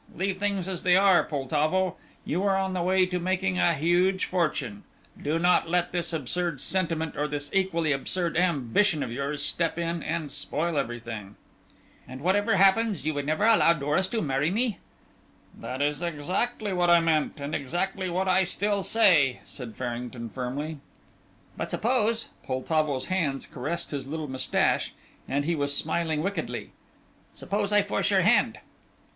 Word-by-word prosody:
Leave 190 +1 -2
things 200 -3 -1
as 185 -3 -3
they 180 0 +4
are, 195 -2 +5
Poltavo. 155 +6 0 0.3
You 170 +5 -1
are 195 -1 +3
on 190 -1 -1
the 180 - -1
way 185 +1 +3
to 180 0 -2
making 185 +1 0
a 170 - +3
huge 175 +5 +2
fortune; 150 - -2 0.4
do 155 +3 0
not 175 -1 +3
let 175 0 +1
this 175 -1 -1
absurd 165 +1 -1
sentiment, 165 -2 -1
or 150 +1 -1
this 145 0 -5
equally 185 -5 +1
absurd 170 +5 -1
ambition 165 - +2
of 115 - -5
yours, 140 +4 -3
step 165 -1 -1
in 170 0 -2
and 155 -3 -3
spoil 160 +1 -2
everything." 115 -5 -5 0.7
"And 130 +1 -9
whatever 205 +6 +2
happens 195 0 +3
you 155 - 0
would 145 -1 -3
never 155 +6 0
allow 225 -7 +6
Doris 150 +5 0
to 225 +2 -2
marry 140 +1 +1
me?" 220 +1 0 0.8
"That 130 +3 -4
is 145 +2 -1
exactly 185 +7 -2
what 175 -1 +2
I 170 0 +7
meant, 160 -2 0
and 140 +2 -5
exactly 185 +6 -2
what 185 +2 -1
I 185 +1 +4
still 200 +2 0
say," 180 - +4
said 120 -5 -8
Farrington, 120 -1 -5
firmly. 140 +5 -4 0.8
"But, - - -4
suppose," 230 -1 0
Poltavo's 140 0 -1
hands 155 -8 -1
caressed 150 +7 -4
his 140 -2 -4
little 155 +1 -4
moustache, 130 -1 0 0.3
and 145 +1 0
he 170 - +1
was 145 -2 +1
smiling 160 -3 -1
wickedly, 200 +2 -3 0.6
"suppose 205 0 -2
I 205 -1 +5
force 205 - 0
your - - +4
hand?" - - +3
170 Hz, 160 wpm, -27 LUFS, 145-190 Hz, 0.8 s, I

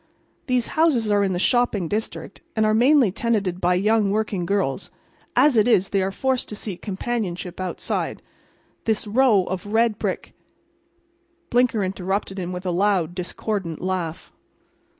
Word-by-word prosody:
These 250 -2 +1
houses 280 -10 +2
are 205 0 +3
in 190 -1 0
the - - -1
shopping 215 -3 +2
district, 215 +6 -4
and 220 -1 +2
are 215 - +3
mainly 250 -1 +5
tenanted 195 -5 -1
by 180 +1 +3
young 210 +2 +2
working 200 -4 -1
girls. 195 -5 -1 0.5
As 295 -4 +5
it 220 +1 +4
is 195 -5 +3
they 195 - +1
are 190 - 0
forced 260 +5 -1
to 210 - -5
seek 205 -3 -6
companionship 190 -4 -4
outside. 185 -2 -3 0.6
This 220 -1 0
row 215 -2 +4
of 185 +2 -5
red 220 0 +2
brick—" - - -3 1.2
Blinker 240 -4 +3
interrupted 190 +1 -2
him 180 -1 -4
with 180 +1 -6
a 180 - 0
loud, 180 -2 +1
discordant 180 -1 -3
laugh. 185 -2 -3
205 Hz, 150 wpm, -23 LUFS, 185-225 Hz, 1.2 s, mainly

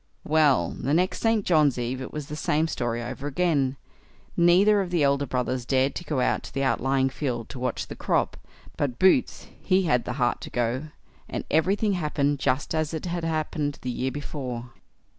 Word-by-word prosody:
Well, 150 - +3
the 140 +5 +1
next 180 +2 +1
St. 225 -3 +1
John's 150 -6 +3
eve 125 +2 -3
it 130 - -6
was 150 -2 -5
the 150 - -6
same 155 +1 +1
story 120 -5 -2
over 130 +4 -5
again; 145 -4 +1 0.6
neither 190 +5 +5
of 185 - -3
the 175 -4 +1
elder 140 0 +2
brothers 125 0 -1
dared 130 +2 +1
to - - -5
go 150 -5 -1
out - - +1
to - - -10
the 135 - 0
outlying 135 +1 +1
field 125 -5 -3
to 135 - -8
watch 125 -1 -2
the - - -8
crop; - - 0 0.4
but 130 -4 -1
Boots, 190 +7 +3 0.2
he 190 0 +2
had 125 -8 +1
the 125 - -3
heart 120 -2 0
to - - -7
go, 120 +4 -1 0.4
and - - -3
everything 195 +6 +2
happened 145 -4 0
just 130 +2 0
as 155 0 -1
it 160 - -5
had 175 -1 -3
happened 155 -2 -2
the 125 - -2
year 130 +2 -1
before. 130 -4 -5
145 Hz, 195 wpm, -26 LUFS, 130-160 Hz, 0.6 s, neither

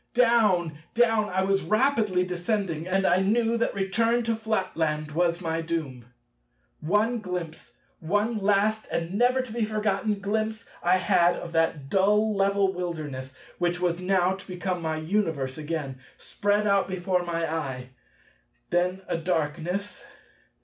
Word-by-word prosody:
Down! 225 -8 +4
down! 150 - -13 0.2
down! 225 -3 +3
I 190 +1 0
was 195 0 +2
rapidly 215 -5 +2
descending; 180 -2 -2
and 190 +1 +1
I 180 0 +4
knew 225 +4 +2
that 230 - -1
return 230 +5 +1
to 230 0 0
Flatland 170 -9 -1
was 170 +2 +1
my 165 -1 -1
doom. 155 -7 -4 0.7
One 210 +9 +1
glimpse, 180 -5 -6 0.2
one 205 +7 0
last 210 +2 +1
and 170 +2 -2
never 245 +5 +3
to 240 -4 -9
be 235 -1 -1
forgotten 215 -1 0
glimpse 220 +2 -2 0.2
I 180 +2 +4
had 180 -2 +3
of 170 - -7
that 165 -4 0
dull 210 +5 +3
level 195 0 +2
wilderness—which 165 0 -4
was 175 -1 0
now 185 0 +2
to 190 0 -10
become 180 -1 -3
my 160 -1 -2
Universe 155 -6 -1
again—spread 155 +7 -2
out 200 -1 +3
before 185 -1 0
my 170 -1 -2
eye. 130 -6 -4 0.8
Then 180 +2 0
a - - -1
darkness. 170 +4 -2
185 Hz, 140 wpm, -26 LUFS, 165-210 Hz, 0.8 s, Down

